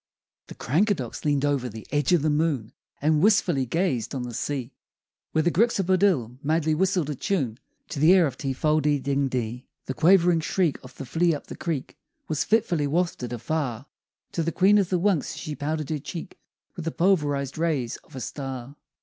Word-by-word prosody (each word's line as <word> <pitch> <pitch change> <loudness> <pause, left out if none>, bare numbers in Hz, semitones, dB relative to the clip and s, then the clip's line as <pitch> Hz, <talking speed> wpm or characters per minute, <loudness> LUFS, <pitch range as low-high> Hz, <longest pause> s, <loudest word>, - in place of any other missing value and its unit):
] - - -69
The - - -10
Crankadox 155 - 0
leaned 145 -1 +2
o'er 140 -4 0
the 110 +1 -9
edge 145 0 +1
of 175 -5 +4
the 155 - +2
moon 150 -7 0 0.3
And 155 0 +3
wistfully 185 - +3
gazed 145 - -1
on 130 - -2
the 120 -1 -6
sea 135 +1 -3 0.6
Where 160 - +2
the 175 - +2
Gryxabodill 185 - +2
madly 155 +1 +1
whistled 180 -2 +1
a - - -1
tune 135 - -1 0.3
To 150 - -4
the 155 +4 +6
air 185 -3 +6
of 135 -5 -3
Ti 135 0 -3
fol 155 +3 +2
de 145 0 +2
ding 140 +1 0
dee. 125 -1 -3 0.2
The 130 - -3
quavering 175 +2 +4
shriek 165 -1 0
of 130 - -13
the - - -7
Fliupthecreek 160 0 -1 0.3
Was 155 -1 0
fitfully 180 -9 +1
wafted 160 -6 -1
afar 125 0 -3 0.5
To 170 - -1
the 165 +1 0
Queen 195 +4 +5
of 190 -3 0
the 185 - +2
Wunks 185 -4 +1
as - - -8
she 155 -2 -5
powdered 155 +1 -3
her 155 - -1
cheek 165 +5 -8 0.4
With 170 - -6
the 165 - -1
pulverized 150 -7 +1
rays 150 -8 0
of - - -18
a 130 - -5
star. 135 +1 -6
150 Hz, 190 wpm, -25 LUFS, 135-170 Hz, 0.6 s, the